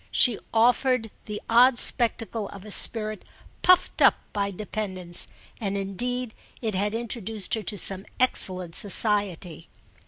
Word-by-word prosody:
She 240 -5 +4
offered 240 0 +2
the 210 -1 -6
odd 240 +2 +5
spectacle 225 -3 -1
of 200 0 -12
a 210 - -9
spirit 215 0 +3 0.4
puffed 365 0 +3
up - - +6 0.2
by 200 -1 -1
dependence, 190 -3 -5 0.3
and 200 -3 -2
indeed 240 +5 -3 0.3
it 220 -3 -3
had 205 +3 -1
introduced 225 -3 -3
her 220 - 0
to 210 0 -4
some 195 +2 +1
excellent 185 -8 +2
society. 200 -5 +1
215 Hz, 130 wpm, -25 LUFS, 195-230 Hz, 0.4 s, up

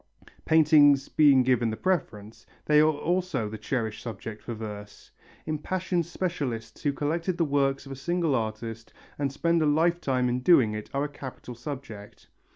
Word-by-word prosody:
Paintings 150 -3 +5
being 140 -4 +5
given 120 -2 +2
the 110 - -4
preference, 115 - -3 0.2
they 150 0 +5
are 155 +1 +5
also 160 -5 -1
the 110 0 -7
cherished 110 -5 -3
subject 115 -2 -7
for 120 - -6
verse. 105 -2 -9 0.3
Impassioned 170 +3 -2
specialists 135 -12 -4
who 145 - +1
collect 165 +5 -2
the 170 - +2
works 140 -1 0
of 135 - -10
a - - -5
single 170 +2 -1
artist 115 -1 -4 0.3
and 140 -2 0
spend 170 +4 +1
a 155 - +2
lifetime 150 -5 +1
in 125 +1 0
doing 125 -6 +4
it 105 0 -6
are 140 +1 -1
a - - -1
capital 135 -3 -9
subject. 120 -5 -9
140 Hz, 165 wpm, -27 LUFS, 115-160 Hz, 0.3 s, Paintings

